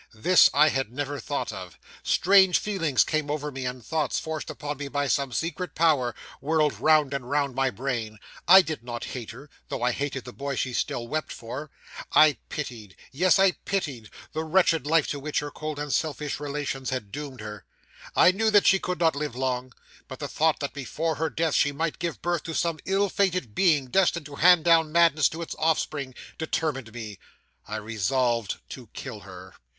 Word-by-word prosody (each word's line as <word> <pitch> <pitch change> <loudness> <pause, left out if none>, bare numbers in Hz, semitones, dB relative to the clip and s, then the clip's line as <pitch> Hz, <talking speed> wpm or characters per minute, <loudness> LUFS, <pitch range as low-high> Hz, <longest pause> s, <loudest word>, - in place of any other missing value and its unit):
This 180 +12 +6
I 150 +2 +5
had 135 -6 -2
never 145 +2 -4
thought - - -3
of. - - -9 0.2
Strange 190 -1 +5
feelings 165 -10 +1
came 155 -2 -2
over 150 0 -3
me, 130 -2 -4
and 125 -3 -6
thoughts, 155 +4 -1
forced 160 -1 -5
upon 145 -1 -5
me 145 0 -5
by 145 +1 -1
some 140 -1 0
secret 165 +4 -3
power, 145 -8 +2 0.2
whirled 155 0 +1
round 155 -3 +4
and 125 -3 -4
round 140 -2 0
my 135 +1 +1
brain. 115 -2 -4 0.3
I 190 +2 +9
did 155 -7 -5
not 120 -1 -6
hate 120 -4 -6
her, 125 +7 -10 0.2
though 120 - -4
I 125 - +3
hated 135 0 -4
the 125 - -9
boy 140 0 -4
she 130 0 -2
still 120 0 -2
wept 155 +4 -3
for. 130 +6 -7 0.4
I 155 -1 +6
pitied 115 - -6 0.2
yes, 180 +7 +3
I 195 -1 +5
pitied 140 - -4 0.2
the 160 - -2
wretched 160 -3 +2
life 160 -1 +3
to 145 - -3
which 150 +2 -4
her 145 0 -1
cold 155 0 -5
and 145 -2 -3
selfish 150 -2 -2
relations 140 -2 -4
had 125 -6 -4
doomed 140 -4 -7
her. 105 -2 -8 0.5
I - - +7
knew 220 +4 +1
that 205 -2 +5
she 195 - +5
could 180 -3 -3
not 165 -3 +3
live 145 -4 -3
long; 130 0 -2 0.4
but - - -8
the - - -5
thought 160 0 +1
that 140 - -3
before 150 +4 -2
her 160 +1 0
death 160 -2 -1
she 145 - +3
might 160 +2 -3
give 170 -1 -4
birth 175 -2 0
to 165 - -5
some 165 -2 0
ill 195 +1 +2
fated 185 - 0
being, 155 - +3
destined 175 -4 +2
to 145 -1 -10
hand 175 -1 +6
down 165 -2 +4
madness 165 -3 +4
to 165 +2 -6
its - - -7
offspring, 150 -4 -1 0.2
determined 150 -6 -2
me. 110 -4 -8 0.5
I 105 - -5
resolved 115 +2 -1
to - - -9
kill - - -7
her. - - -12
145 Hz, 195 wpm, -26 LUFS, 130-160 Hz, 0.5 s, I